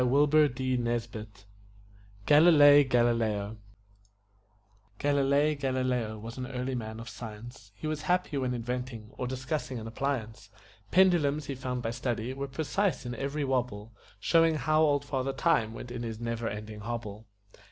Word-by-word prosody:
GALILEI 145 +4 +4 2.4
GALILEO 115 -4 +1 1.4
Galilei 145 +1 +2
Galileo 130 -5 -1
was 115 +4 -8
an 125 - -4
early 130 0 -3
man 110 -2 -5
of 115 - -8
science; 115 -1 -9
He 155 - -9
was 155 -1 -2
happy 180 0 0
when 125 -1 -1
inventing, 120 -2 -5
or 125 - -2
discussing 130 0 -3
an 110 - -6
appliance; 115 -3 -3 0.4
Pendulums, 155 - +3
he 140 - -4
found 125 -1 -4
by 115 - -1
study, 120 -1 -3
were 140 +1 -4
precise 160 +6 -1
in 120 - -4
every 140 +4 -3
wobble 120 -5 -2 0.3
Showing 165 +6 +4
how 155 0 +2
old 145 -2 +2
Father 135 -1 -2
Time 130 -11 +2
went 120 - -8
in 120 -1 -5
his 115 -2 -5
never 115 -1 -3
ending 105 +1 -7
hobble. 110 -1 -6
125 Hz, 135 wpm, -29 LUFS, 115-140 Hz, 2.4 s, GALILEI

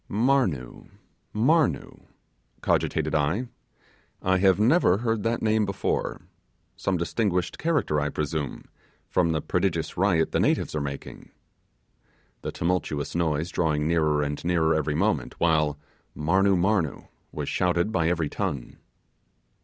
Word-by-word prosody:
'Marnoo, 110 - 0 0.4
Marnoo,' 125 - +1 0.5
cogitated - - 0
I, 80 - 0 0.7
'I 95 0 +3
have 95 0 +4
never 110 - +4
heard 115 -1 -1
that 115 +2 -1
name 110 0 +3
before. 100 -1 -2 0.5
Some 95 -2 -1
distinguished 90 0 -1
character, 150 - +1
I 75 - 0
presume, 75 0 -3 0.4
from 85 -2 +1
the 80 -1 0
prodigious - - -1
riot 90 -4 +2
the - - +1
natives - - +1
are 75 - -1
making;' 70 -1 -7 1.1
the - - -4
tumultuous 80 -4 -2
noise 80 0 0
drawing 75 -3 0
nearer 75 -3 +2
and 75 0 -4
nearer 85 -2 +2
every 75 -1 0
moment, - - 0
while 75 -3 +2 0.4
'Marnoo! 95 +5 +2
Marnoo!' 90 -4 0 0.2
was - - -4
shouted 90 +3 +1
by 85 -5 +1
every 85 -3 0
tongue. 70 -2 -4
85 Hz, 125 wpm, -26 LUFS, 75-100 Hz, 1.1 s, have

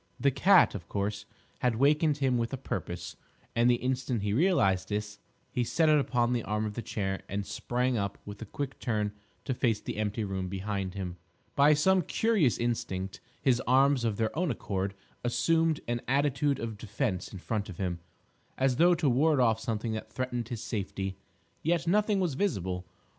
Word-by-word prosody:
The 140 - +3
cat, 195 +9 +5
of 90 -5 -7
course, 100 0 -2 0.3
had 125 -2 +1
wakened 150 +4 +3
him 130 -4 +1
with 115 -1 -1
a - - -1
purpose, 85 -9 -5 0.4
and 120 +1 +4
the 120 - +5
instant 125 -3 -1
he 105 -1 0
realised 120 - +3
this, 105 0 -3 0.3
he 125 - 0
set 160 +6 +2
it 150 -1 +6
upon 125 -3 +1
the 120 - +1
arm 105 +1 -1
of 105 - -3
the 120 - -4
chair 95 -3 -3
and 100 0 -2
sprang 125 +3 -1
up 100 0 -2
with 105 +1 -8
a - - -4
quick 135 +5 -5
turn 105 -3 -1 0.3
to 130 - 0
face 115 -3 +1
the - - -6
empty 110 +1 -1
room 95 -2 -3
behind 100 0 -3
him. 90 -2 -4 0.4
By 145 +2 +6
some 190 +5 +4
curious 185 - +2
instinct, 95 -5 -2 0.2
his 130 -3 +3
arms 135 0 +4
of 110 -3 0
their 110 -1 -1
own 175 +1 +1
accord 100 -5 -2 0.3
assumed 160 +5 +2
an 120 0 -1
attitude 140 +1 +2
of 110 -2 -5
defence 105 -3 -2
in 100 - -7
front 100 +2 -3
of 90 - -8
him, 90 -3 -2 0.6
as 130 -2 +2
though 175 +3 +6
to 160 - 0
ward 140 +3 +3
off 115 -3 +3
something 115 -1 -2
that 110 0 -5
threatened 125 -3 -3
his 120 -3 -5
safety. 95 -3 -3 0.5
Yet 170 +1 +1
nothing 210 +3 +2
was 180 -6 0
visible. 95 - -1
120 Hz, 185 wpm, -29 LUFS, 100-140 Hz, 0.6 s, it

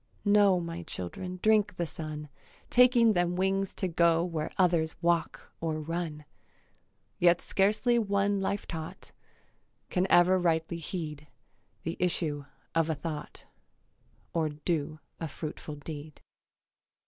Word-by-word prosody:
Know, 205 -2 +5
My 170 0 -5
children 180 - -6
drink 215 -2 +4
the 175 - -1
sun, 155 -2 -6 0.4
Taking 240 -2 +6
them 175 -1 +1
wings 195 +1 0
to 190 - -1
go 170 -1 +3
Where 165 -3 -2
others 170 -4 +2
walk 170 -1 0
or 160 -1 -1
run: 155 -1 -4 0.9
Yet 175 0 +5
scarcely 215 +5 +2
one 200 -1 +1
life 200 +1 -1
taught 160 -2 -7 0.8
Can 185 +1 +2
ever 180 +2 +6
rightly 165 -1 +1
heed 150 -3 -5 0.6
The 165 - -3
issue 155 -5 -1 0.3
of 165 0 +2
a 160 - +1
thought 150 +1 -6 0.9
Or 160 -2 +1
do 155 0 -2 0.2
a 165 - -3
fruitful 150 0 -6
deed. 150 0 -8
170 Hz, 125 wpm, -29 LUFS, 155-190 Hz, 0.9 s, Taking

